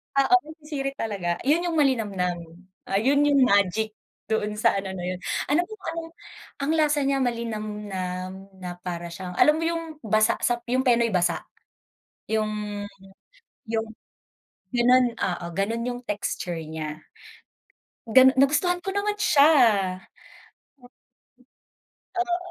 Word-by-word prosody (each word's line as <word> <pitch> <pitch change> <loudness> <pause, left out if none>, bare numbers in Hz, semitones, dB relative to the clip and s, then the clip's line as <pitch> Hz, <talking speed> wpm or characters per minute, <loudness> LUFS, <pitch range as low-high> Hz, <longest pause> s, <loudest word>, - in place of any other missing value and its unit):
Oo, 275 +6 +5 0.3
sirit 275 -3 -4
talaga. 195 -8 -2
Yun 320 +7 +2
yung 335 - -2
malinamnam, 210 - +1 0.5
ah, - - -2
'yon 280 +6 +3
yung 280 -2 +5
magic 200 -1 +2 0.4
doon 210 -1 0
sa - - +3
ano 195 -1 -5
na 180 - -6
yun. 180 0 -3 0.3
Alam 305 +5 +3
mo 435 - -9 0.2
anong 330 0 -6 0.5
ang 280 +2 0
lasa 300 -2 +2
niya 275 0 +1
malinamnam 205 -5 -4
na 180 -1 -6
para 175 -1 -4
siyang 180 +1 -7
alam 300 - +6
mo 320 - -2
yung 330 0 -1 0.2
basa 215 0 +3
sa 240 -1 +2
yung 255 +2 +1
Penoy 235 -3 +3
basa? 180 -2 +1 0.9
Yung 210 -1 -2 0.8
yung, 225 0 -2 0.9
gano'n, 245 0 +4
oo 175 -1 -2
gano'n 225 +5 -1
yung 245 0 -4
texture 185 -4 -3
niya, 155 -1 -6 1.1
ganu 260 +3 +7
nagustuhan 300 +7 +3
ko 390 - -2
naman 410 +1 0
siya. 305 -5 +5 2.6
Oo. 355 -1 0
230 Hz, 125 wpm, -25 LUFS, 195-280 Hz, 2.6 s, ganu